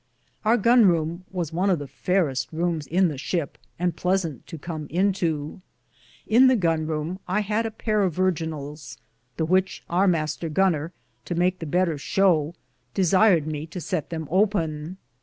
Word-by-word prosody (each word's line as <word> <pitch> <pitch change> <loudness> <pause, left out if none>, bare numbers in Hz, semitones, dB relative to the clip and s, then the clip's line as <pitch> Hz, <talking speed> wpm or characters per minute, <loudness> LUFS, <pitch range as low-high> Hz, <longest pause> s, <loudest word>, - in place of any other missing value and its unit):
Our 225 +2 +4
gonroume 185 -7 +3
was 175 -5 -4
one 185 +4 +1
of 185 - +3
the 145 - -6
fayereste 135 0 0
Roumes 165 -2 -2
in 185 +3 +3
the 145 -4 -6
ship, 165 0 -3 0.2
and 175 -2 -1
pleasant 180 - -1
to 165 - -7
com 155 0 -6
into. 170 -3 -1 0.6
In 245 +4 +6
the 260 -1 +4
gonroume 160 -1 -1
I 190 +4 +1
had 215 +2 -1
a - - -3
pare 215 -1 -1
of 185 -5 0
virginals, 160 -5 -3 0.4
the 160 - 0
which 185 +3 +1
our 185 +3 +3
Mr. 160 -1 -1
goner, 165 -2 +1 0.3
to 175 - -3
make 180 +1 +1
the 165 - -5
better 170 0 +1
showe, 170 -2 +2 0.4
desired 185 -2 +4
me 155 0 -4
to 180 - -7
sett 175 -3 -3
them 160 -2 -5
open. 175 -4 0
175 Hz, 160 wpm, -24 LUFS, 155-190 Hz, 0.6 s, In